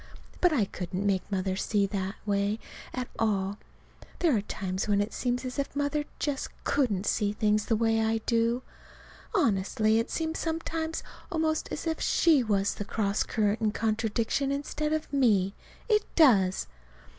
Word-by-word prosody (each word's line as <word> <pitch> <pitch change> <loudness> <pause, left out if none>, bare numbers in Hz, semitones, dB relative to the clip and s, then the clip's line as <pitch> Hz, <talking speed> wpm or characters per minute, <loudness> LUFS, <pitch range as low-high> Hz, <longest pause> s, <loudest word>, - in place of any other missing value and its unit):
But 360 - +5
I 245 -10 +2
couldn't 185 +1 -4
make 195 0 0
Mother 190 -1 0
see 205 +1 +1
it 195 - -1
that 195 -1 -2
way 200 +1 +1 0.3
at 250 -1 -3
all. 205 -2 0 0.6
There 330 -7 +3
are 210 - +1
times 190 -2 -3
when 205 -1 +3
it 205 +2 -1
seems 250 0 -1
as 255 +3 -4
if 280 - -3
Mother 290 +1 0
just 285 -2 -2
couldn't 215 -9 +1
see 205 -2 +1
things 210 0 +1
the 225 - +3
way 225 0 +2
I 225 0 +2
do. 235 +2 +1 0.7
Honestly, 215 - +2
it 230 - -2
seems 320 0 -2
sometimes 325 0 -2 0.3
almost 315 -2 0
as - - -4
if 320 -1 -1
she 320 -5 +4
was 200 -3 +1
the - - -4
cross 205 0 -1
current 215 0 +1
and 215 -1 +1
contradiction 225 +4 0
instead 295 +2 -2
of 310 -2 -2
me. 205 -8 +3 0.3
It 425 -3 +3
does. 200 - +5
225 Hz, 165 wpm, -28 LUFS, 205-285 Hz, 0.7 s, But